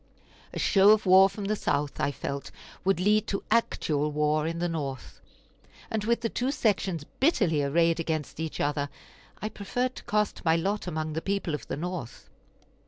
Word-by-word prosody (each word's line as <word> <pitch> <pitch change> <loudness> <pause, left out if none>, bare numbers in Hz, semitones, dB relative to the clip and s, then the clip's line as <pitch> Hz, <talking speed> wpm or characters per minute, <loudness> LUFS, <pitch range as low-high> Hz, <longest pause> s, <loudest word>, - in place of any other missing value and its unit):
A - - -7
show 195 -1 +5
of 215 0 +5
war 190 +1 +7
from 200 +1 -6
the 210 +2 0
South, 145 -7 -1
I 145 - +1
felt, 140 0 -5 0.3
would 195 -2 +2
lead 210 +3 +3
to 195 - -2
actual 150 -9 +1
war 150 +1 +1
in 165 +1 -3
the 175 +1 0
North; 140 -6 -5 0.7
and 220 -1 -1
with 235 0 +1
the 230 - 0
two 250 +4 -1
sections 195 - 0 0.2
bitterly 195 - +3
arrayed 165 +4 +2
against 160 -2 -3
each 160 -1 -4
other, 145 0 0 0.5
I 215 - -1
preferred 245 +5 -2
to - - -9
cast 210 -1 0
my 160 -1 +4
lot 195 +4 -1
among 155 -2 -3
the 160 - -2
people 195 -4 -2
of 150 - -5
the - - -3
North. 175 -6 -6
175 Hz, 180 wpm, -28 LUFS, 150-210 Hz, 0.7 s, war